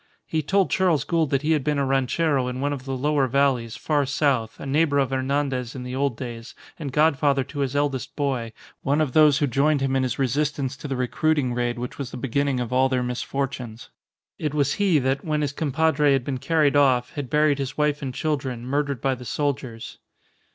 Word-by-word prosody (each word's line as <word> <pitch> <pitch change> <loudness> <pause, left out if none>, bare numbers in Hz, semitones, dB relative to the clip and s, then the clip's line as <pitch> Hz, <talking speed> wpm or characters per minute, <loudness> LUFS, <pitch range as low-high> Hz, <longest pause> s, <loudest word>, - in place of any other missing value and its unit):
He 160 - -1
told 190 +5 +1
Charles 175 -7 +2
Gould 165 -3 0
that 140 +1 0
he 155 - +1
had 150 -4 +2
been 150 0 0
a 140 - +1
ranchero 135 +1 +1
in 125 0 -4
one 145 +1 0
of 135 -2 -7
the 135 -1 -3
lower 145 0 +1
valleys, 125 -3 +1
far 145 +2 0
south, 130 -5 0
a - - -7
neighbour 145 +1 +2
of 135 -1 +1
Hernandez 135 -2 -1
in 125 - -6
the 125 +1 -5
old 135 -3 0
days, 120 -1 -7 0.2
and 145 -4 -4
godfather 145 -2 +3
to 140 +2 -8
his 140 -1 -1
eldest 145 -3 -1
boy; 130 -6 -1 0.3
one 140 +3 +1
of 155 -4 +1
those 150 -1 +5
who 145 - +2
joined 140 +3 +2
him 135 0 0
in 135 - +2
his 125 -2 -1
resistance 140 +1 -1
to 145 - -7
the 135 - -2
recruiting 130 +1 0
raid 120 0 -1
which 125 +3 -6
was 135 -3 -4
the - - -8
beginning 135 +1 0
of 125 0 -3
all 130 +1 +3
their 130 -1 0
misfortunes. 125 -2 -4 0.5
It 150 -1 -2
was 140 -2 +2
he 190 -6 +4
that, 135 0 0
when 155 -1 -1
his 145 -2 -1
compadre 150 0 +2
had 135 -2 +1
been 130 -1 -3
carried 150 -1 +2
off, 130 -4 +3
had 145 -6 -5
buried 150 -1 +2
his 135 0 -4
wife 150 0 +1
and 135 -2 -3
children, 130 -4 -3
murdered 140 -1 -1
by 135 -1 +1
the 125 -1 -8
soldiers. 125 -3 -3
140 Hz, 215 wpm, -24 LUFS, 130-150 Hz, 0.5 s, those